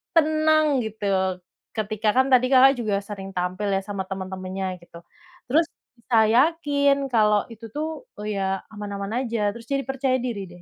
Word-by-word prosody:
tenang 310 -2 +3
gitu. 220 -1 -6 0.7
Ketika 215 0 -1
kan 260 +1 +5
tadi 255 0 +6
Kakak 265 +1 +7
juga 215 -3 0
sering 195 -2 -7
tampil 180 +3 -2
ya 195 - 0
sama 200 -1 -4
teman-temannya, 190 -1 -4
gitu. 170 0 -13 0.5
Terus 320 +3 +4 0.3
bisa 235 0 0
yakin 280 0 +2
kalau 210 -2 +4
itu 225 +1 -10
tuh 315 +10 -4 0.2
ya 195 -2 -1
aman-aman 200 -1 -5 0.2
aja. 230 0 -2 0.2
Terus 230 -1 -11
jadi 275 0 +1
percaya 270 -1 0
diri 235 -5 -3
deh. 175 - -14
220 Hz, 155 wpm, -24 LUFS, 195-275 Hz, 0.7 s, Kakak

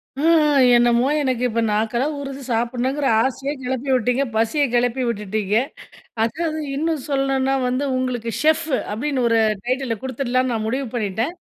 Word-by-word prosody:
ம். 280 - -4
ஆ. - - +5 0.5
என்னமோ 240 +1 +3
எனக்கு 255 -3 -1
இப்போ 230 0 -1
நாக்கெல்லாம் 235 +7 0
ஊறுது 275 0 -6
சாப்பிடணுங்கிற 250 +4 0 0.2
ஆசையே 270 +2 -2
கெளப்பி 260 +1 -3
விட்டீங்க. 250 +3 +1
பசிய 230 +7 +2
கிளப்பி 245 +1 +1
விட்டுட்டீங்க. 210 -1 -1 0.7
அதாவது 315 +6 -2 0.2
இன்னும் 315 -1 -1
சொல்லணுன்னா 270 -1 +1
வந்து, 255 +3 -1
உங்களுக்கு 245 -3 -2
"ஷெஃப்ஃபு" 315 -2 +2 0.2
அப்டின்னு 260 +2 -1
ஒரு 230 0 +3 0.3
டைட்டிலில 255 -2 -1
கொடுத்துடலாம்ன்னு 255 -1 -1
நான் 220 -1 -2
முடிவு 260 +2 -2
பண்ணிட்டேன். 225 - -1
255 Hz, 140 wpm, -21 LUFS, 235-275 Hz, 0.7 s, ஆ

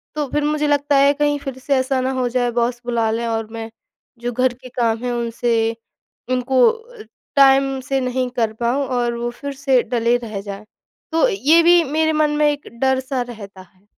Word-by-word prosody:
तो 300 -2 -2
फिर 295 - 0
मुझे 300 0 0
लगता 290 0 +1
है, 280 +1 +5
कहीं 290 0 0
फिर 270 -2 -6
से 275 +2 0
ऐसा 260 0 0
ना 260 +1 -1
हो 250 - +1
जाए, 245 0 0
बॉस 240 +1 -1
बुला 235 -2 0
लें 230 +1 -2
और 225 -1 -2
मैं 225 0 -6 0.5
जो 240 +1 -3
घर 255 +1 +1
के 255 +1 -13
काम 235 -2 0
हैं 250 - -1
उनसे 230 -1 0 0.6
उनको 255 0 +3
अ, 455 0 -8 0.3
टाइम 270 -1 +4
से 270 +1 -1
नहीं 255 0 -1
कर 225 -2 +1
पाऊँ 250 +4 +1
और 240 -2 -1
वो 240 0 -2
फिर 280 +3 -7
से 270 -2 +2
टले 235 0 +2
रह 220 -4 -6
जाएँ। 200 +1 -8 0.5
तो 325 0 +3
ये 290 +12 +4
भी 345 0 +6
मेरे 315 +2 0
मन 305 -1 +2
में 300 0 +4
एक 290 0 -7
डर-सा 265 0 0
रहता 200 -5 -10
है। 185 +2 -23
255 Hz, 200 wpm, -20 LUFS, 235-285 Hz, 0.6 s, भी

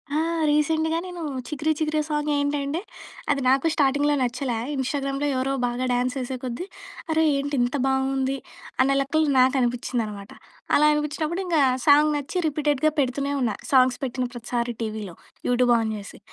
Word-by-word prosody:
ఆ! - - +2 0.3
రీసెంట్‍గా 315 +2 +2
నేను 355 -2 -7 0.3
'చికిరి, 305 +1 -1
చికిరియ' 305 -1 0
సాంగ్ 300 0 -1
ఏంటంటే 285 +3 -1 0.5
అది 280 -1 0
నాకు 270 +4 +3
స్టార్టింగ్‌లో 290 0 +2
నచ్చలే, 250 -1 -1 0.2
ఇన్‌స్టాగ్రామ్‍‌లో 275 +1 -1
ఎవరో 265 +1 0
బాగా 245 +1 -2
డ్యాన్స్ 250 +2 0
యేసేకొద్దీ, 255 +4 -4 0.5
అరే! 320 0 +3
ఏంటి 285 +1 -2
ఇంత 245 +4 0
బావుంది 265 0 0 0.4
అనే 275 +1 +3
లెక్కలో 310 +3 +1
నాకు 260 +1 +4
అనిపించింది 245 -1 0
అనమాట. 200 -1 -8 0.4
అలా 300 - +5
అనిపించినప్పుడు 305 +4 -2
ఇంక 340 -3 +1 0.3
సాంగ్ 295 +1 +6
నచ్చి 290 +6 -4
రిపీటెడ్‍గా 300 0 +1
పెడుతూనే 280 +2 0
ఉన్నా. 225 -4 0 0.2
సాంగ్స్ 255 -1 +5
పెట్టిన 255 -1 -2
ప్రతిసారి 240 0 -3
టీవీలో. 215 -5 -4 0.3
యూట్యూబ్ 245 -1 +3
ఆన్ 220 -1 -1
చేసి. 200 -1 -10
275 Hz, 145 wpm, -24 LUFS, 250-300 Hz, 0.5 s, సాంగ్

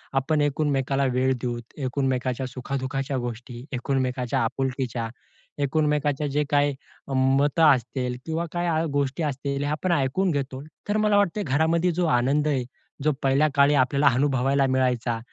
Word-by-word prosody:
आपण 150 +3 +1
एकमेकाला 140 -2 0
वेळ 130 +1 +2
देऊ, 120 -1 -2 0.2
एकमेकाच्या 130 -1 -1
सुखा-दु:खाच्या 130 +1 -3
गोष्टी, 120 0 -6
एकमेकाच्या 125 -1 -1
आपुलकीच्या, 125 -2 -2 0.5
एकमेकाच्या 150 0 +1
जे 145 +2 0
काही 145 -1 +2 0.4
मतं 135 +4 +3
असतील 125 0 -3
किंवा 165 +1 -2
काय 175 0 -1
आ 160 -1 +1
गोष्टी 140 +3 -1
असतील 140 0 -2
हे 145 - -1
आपण 175 +4 -1
ऐकून 170 +5 +1
घेतो, 135 -2 -3 0.3
तर 210 - +2
मला 210 -1 +3
वाटते 205 +1 +1
घरामध्ये 160 +5 +2
जो 175 +1 0
आनंद 140 +5 +2
आहे, 135 -4 +1 0.4
जो 155 - +3
पहिल्या 135 +3 +3
काळी 140 +1 +5
आपल्याला 140 +2 +3
अनुभवायला 135 0 +2
मिळायचा. 125 -3 0
135 Hz, 140 wpm, -25 LUFS, 130-150 Hz, 0.5 s, काळी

